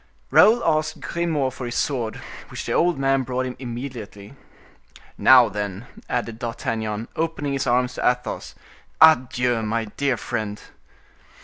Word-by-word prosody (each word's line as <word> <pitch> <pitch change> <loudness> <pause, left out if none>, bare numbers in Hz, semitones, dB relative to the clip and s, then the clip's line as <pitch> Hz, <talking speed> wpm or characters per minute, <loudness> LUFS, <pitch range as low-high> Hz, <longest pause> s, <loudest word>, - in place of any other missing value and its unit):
Raoul 230 +3 +6
asked 155 -1 0
Grimaud 155 -6 -1
for 125 -1 -6
his 120 - -5
sword, 120 -6 -1 0.3
which - - -7
the - - -3
old 175 -3 +2
man 135 0 +2
brought 130 0 -2
him 125 -1 -5
immediately. 120 -4 -7 0.8
"Now 125 -2 +7
then," 105 +1 -5 0.2
added 115 -2 -3
D'Artagnan, 115 -2 -3
opening 160 -3 -2
his 135 0 -2
arms 125 +1 +2
to - - +2
Athos, 125 -2 -4 0.4
"adieu, 125 -6 +4
my 110 +1 -1
dear 140 -3 +1
friend!" 110 -4 -4
125 Hz, 135 wpm, -23 LUFS, 115-135 Hz, 0.8 s, Now